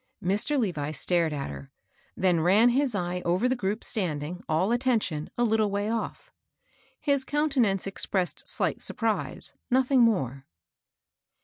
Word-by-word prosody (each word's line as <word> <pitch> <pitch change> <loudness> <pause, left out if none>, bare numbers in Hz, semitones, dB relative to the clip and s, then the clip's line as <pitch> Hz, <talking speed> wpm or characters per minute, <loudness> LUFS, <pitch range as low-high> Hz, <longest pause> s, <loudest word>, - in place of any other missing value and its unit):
Mr. 205 +11 +1
Levi 165 - -1
stared 165 +2 +1
at 140 - -4
her. 70 -1 -10 0.5
then 180 -3 +2
ran 200 +9 +5
his 260 -1 +1
eye 180 -1 -2
over 180 +8 +1
the 255 - +1
group 210 -1 -2
standing, 175 -5 -2
all 165 +7 +1
attention, 235 - 0
a 240 - +2
little 220 -2 +2
way 205 +2 -1
off. 230 - -4 0.7
His 280 -2 +1
countenance 270 -10 +1
expressed 195 -1 -2
slight - - 0
surprise, 225 -2 -1 0.2
nothing 260 0 +3
more. 135 - +1
200 Hz, 135 wpm, -27 LUFS, 175-240 Hz, 0.7 s, ran